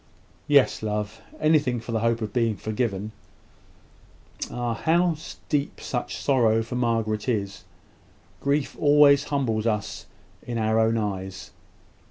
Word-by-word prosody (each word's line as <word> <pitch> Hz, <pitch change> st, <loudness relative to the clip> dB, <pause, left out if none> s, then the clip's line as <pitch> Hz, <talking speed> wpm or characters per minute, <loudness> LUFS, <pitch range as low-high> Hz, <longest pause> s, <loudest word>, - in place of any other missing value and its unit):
"Yes, 140 Hz, -3 st, +4 dB
love; 105 Hz, +1 st, -3 dB, 0.2 s
anything 150 Hz, -6 st, +2 dB
for 115 Hz, -, -7 dB
the 115 Hz, -, 0 dB
hope 115 Hz, +1 st, +1 dB
of 105 Hz, -1 st, -5 dB
being 115 Hz, -4 st, +1 dB
forgiven." 110 Hz, -2 st, -2 dB, 1.4 s
"Ah! 120 Hz, -1 st, -2 dB
how 170 Hz, +7 st, +2 dB, 0.3 s
deep 145 Hz, -2 st, -1 dB
your -, -, -1 dB
sorrow 115 Hz, -5 st, +2 dB
for 115 Hz, -, -8 dB
Margaret 115 Hz, -2 st, 0 dB
is! 100 Hz, -5 st, -2 dB, 0.7 s
Grief 140 Hz, 0 st, 0 dB
always 145 Hz, -1 st, +6 dB
humbles 115 Hz, -6 st, -1 dB
us 105 Hz, -3 st, -2 dB, 0.3 s
in 120 Hz, -1 st, -5 dB
our 110 Hz, 0 st, +2 dB
own 115 Hz, +1 st, +3 dB
eyes. 95 Hz, -3 st, -4 dB
115 Hz, 125 wpm, -25 LUFS, 110-140 Hz, 1.4 s, always